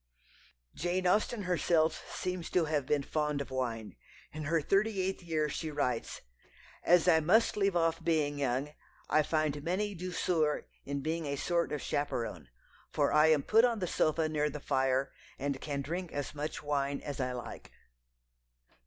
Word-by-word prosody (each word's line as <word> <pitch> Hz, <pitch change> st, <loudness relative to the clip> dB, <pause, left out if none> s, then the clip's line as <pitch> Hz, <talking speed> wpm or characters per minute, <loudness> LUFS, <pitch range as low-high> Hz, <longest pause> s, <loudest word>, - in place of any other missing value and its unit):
Jane 180 Hz, +3 st, -1 dB
Austen 210 Hz, +4 st, +2 dB
herself 170 Hz, -3 st, +1 dB
seems 180 Hz, -2 st, -3 dB
to 175 Hz, -3 st, +2 dB
have 150 Hz, -3 st, -1 dB
been 145 Hz, -2 st, +1 dB
fond 150 Hz, 0 st, -1 dB
of 140 Hz, -1 st, -5 dB
wine. 115 Hz, -, -3 dB, 0.4 s
In 155 Hz, 0 st, -5 dB
her 165 Hz, +2 st, +2 dB
thirty 195 Hz, +6 st, +1 dB
eighth 190 Hz, +1 st, -1 dB
year 160 Hz, -3 st, 0 dB
she 155 Hz, +2 st, -4 dB
writes: 135 Hz, -6 st, -2 dB, 0.6 s
"As 175 Hz, 0 st, +5 dB
I 165 Hz, -3 st, +6 dB
must 190 Hz, +9 st, +3 dB
leave 195 Hz, -2 st, +1 dB
off 165 Hz, -1 st, +1 dB
being 150 Hz, -3 st, +1 dB
young, 135 Hz, +2 st, -1 dB, 0.4 s
I 155 Hz, -, +5 dB
find 150 Hz, -1 st, 0 dB
many 195 Hz, +5 st, -1 dB
douceurs 170 Hz, -4 st, 0 dB, 0.2 s
in 140 Hz, 0 st, -3 dB
being 160 Hz, +2 st, -2 dB
a 140 Hz, -, -1 dB
sort 170 Hz, +4 st, 0 dB
of 150 Hz, -, -3 dB
chaperon, 115 Hz, -, -2 dB, 0.4 s
for -, -, +1 dB
I 150 Hz, +1 st, +6 dB
am 155 Hz, -3 st, +4 dB
put 225 Hz, +2 st, +5 dB
on 240 Hz, -2 st, +3 dB
the 190 Hz, -, -1 dB
sofa 160 Hz, -1 st, +1 dB
near 150 Hz, -1 st, 0 dB
the 150 Hz, +1 st, -6 dB
fire, 135 Hz, 0 st, +1 dB, 0.3 s
and 140 Hz, 0 st, -3 dB
can 140 Hz, -2 st, -3 dB
drink 175 Hz, +4 st, -4 dB
as 145 Hz, 0 st, -4 dB
much 150 Hz, +1 st, -4 dB
wine 140 Hz, -1 st, -1 dB
as 145 Hz, -2 st, -6 dB
I 125 Hz, -1 st, -1 dB
like." 120 Hz, -2 st, -8 dB
155 Hz, 170 wpm, -32 LUFS, 140-175 Hz, 0.6 s, I